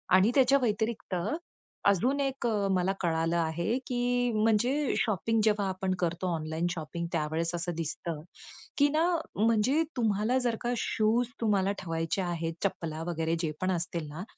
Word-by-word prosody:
आणि 190 +5 +5
त्याच्या 270 0 +6
व्यतिरिक्त 220 -3 -1 0.7
अजून 245 +9 +2
एक 270 -3 -1 0.3
मला 185 +1 +2
कळालं 165 -1 +1
आहे, 170 +7 0
की 245 -1 +1
म्हणजे 230 +7 +2
शॉपिंग 225 +1 +1
जेव्हा 210 -2 +2
आपण 190 0 -1
करतो 175 +1 -1
ऑनलाइन 160 +2 -2
शॉपिंग 170 0 -4
त्यावेळेस 160 +2 -1
असं 175 +1 -2
दिसतं, 165 0 -4 0.6
की 285 - +6
ना, 310 +3 +2 0.3
म्हणजे 230 +8 +3
तुम्हाला 220 +1 +2
जर 235 -2 +2
का 240 0 0
शूज 225 +3 +1
तुम्हाला 200 -3 +2
ठेवायचे 165 +2 -1
आहेत, 170 -2 -2
चप्पला 165 -5 -2
वगैरे 165 -1 0
जे 160 -3 -1
पण 185 0 +1
असतील 170 -2 -2
ना, 155 +5 -6
190 Hz, 145 wpm, -29 LUFS, 165-235 Hz, 0.7 s, त्याच्या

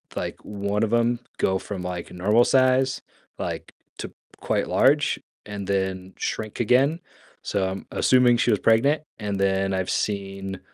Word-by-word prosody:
like, - - -5
1 100 +1 -2
of 115 +1 0
'em 120 0 +2 0.2
go 95 0 +2
from, 100 -3 -6
like, 90 -1 -5
normal 105 +7 +3
size, 130 0 +3 0.4
like, - - -5 0.3
to - - -6 0.3
quite - - -1
large - - +3 0.3
and 100 -2 -6
then 95 -1 -2
shrink 110 +1 -4
again, 135 +8 +3 0.4
so 95 -2 -1
I'm 95 +1 -7
assuming 125 -2 +4
she 120 - +2
was 105 - +2
pregnant, 140 +7 +3 0.2
and 100 -2 -3
then 95 0 +1
I've 95 -1 -1
seen 95 -2 -3
105 Hz, 150 wpm, -24 LUFS, 95-120 Hz, 0.4 s, assuming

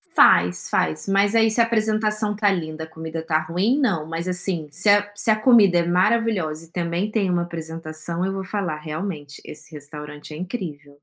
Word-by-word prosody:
Faz, 90 0 +4
faz. 80 - 0
Mas 200 +2 +2
aí 225 0 +5
se 225 - 0
a - - +6
apresentação 215 -1 +1
está 205 -1 +2
linda, 160 -3 -4
comida 160 0 -6
está 160 -1 0
ruim, 180 - 0
não. 195 - +1
Mas, 165 +2 -4
assim, 180 -3 -1
se 195 +5 +1
a 205 0 +4
se 205 - +1
a - - +5
comida 215 -7 +5
é 170 - +1
maravilhosa 185 -3 +1
e 165 - -22
também 175 +4 -2
tem 205 -4 0
uma 175 -1 +1
apresentação, 165 +1 -5
eu 195 - -2
vou 195 0 -4
falar: 185 -5 -3
"Realmente, 155 -1 -6
esse 150 - -9
restaurante 150 0 -9
é 150 - -7
incrível". 160 - -6
175 Hz, 190 wpm, -22 LUFS, 155-205 Hz, -, a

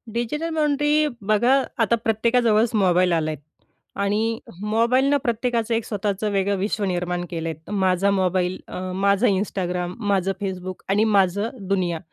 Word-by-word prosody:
Digital 300 +8 -2
boundary 300 0 +2 0.2
बघा, 240 +5 +4 0.2
आता 235 -1 +3
प्रत्येकाजवळच 230 0 +2
mobile 185 -3 +3
आलाय. 155 -2 0 0.7
आणि 220 +3 0 0.2
मोबाईलनं 235 +6 +2
प्रत्येकाचं 235 -1 -1
एक 225 -1 -1
स्वतःचं 205 0 -2
वेगळं 200 0 +1
विश्व 205 +2 -2
निर्माण 180 -1 -2
केलं 165 -1 -3
आहेत. 160 0 -9
माझा 190 0 +2
मोबाईल, 185 -1 0
अ, - - -6 0.2
माझं 200 +4 +2
Instagram, 180 -3 -1
माझं 195 -3 +1
Facebook 185 -1 -5
आणि 205 +2 +3
माझं 200 0 +2 0.2
दुनिया. 180 -4 0
200 Hz, 135 wpm, -23 LUFS, 185-230 Hz, 0.7 s, बघा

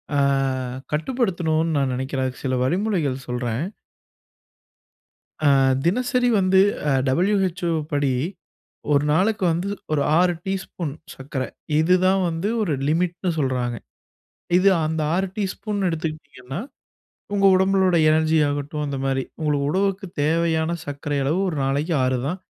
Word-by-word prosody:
அ - - +2 0.8
கட்டுப்படுத்தனும்னு 165 - 0
நான் 135 -2 +1
நெனைக்கிறேன். 130 0 -2
அதுக்கு 130 +2 -5
சில 130 -1 0
வழிமுறைகள் 160 - 0
சொல்றேன். 125 +3 -2 1.8
ஆ, - - +4 0.4
தினசரி 250 +5 +1
வந்து 190 0 +4 0.3
அ - - +2 0.2
WHO 180 -1 +1 0.2
ப்படி, 145 -3 0 0.8
1 140 +1 +3
நாளுக்கு 195 +4 +2
வந்து 175 +5 -2 0.2
ஒரு 145 -2 +2 0.2
6 180 0 +3
டீஸ்பூன் 185 -6 -4 0.2
சக்கர. 135 -1 -4 0.4
இது 180 +3 +4
தான் 190 0 +3
வந்து 165 +6 -2
ஒரு 170 -8 0 0.2
லிமிட்ன்னு 175 +2 0
சொல்றாங்க. 125 -3 -1 0.8
இது 195 +2 +4 0.2
அந்த 160 0 -2
6 190 +2 +1
டீஸ்பூன் 205 +1 -3
எடுத்துக்கிட்டீங்கன்னா, 155 -3 -5 0.8
உங்க 195 0 +3
உடம்புனுடைய 190 -3 +3
எனர்ஜி 160 0 +3
ஆகட்டும் 145 +1 -3
அந்த 140 -1 -3
மாரி. 135 -1 0 0.2
உங்க 150 -1 +1
உடலுக்கு 195 +3 0 0.2
தேவையான 165 +1 +1
சக்கரை 145 0 -3
அளவு 160 +7 +1
1 155 - -4
நாளைக்கு 145 +5 0
6 130 -1 +1
தான். 180 +4 -4
160 Hz, 125 wpm, -23 LUFS, 145-190 Hz, 1.8 s, ஆ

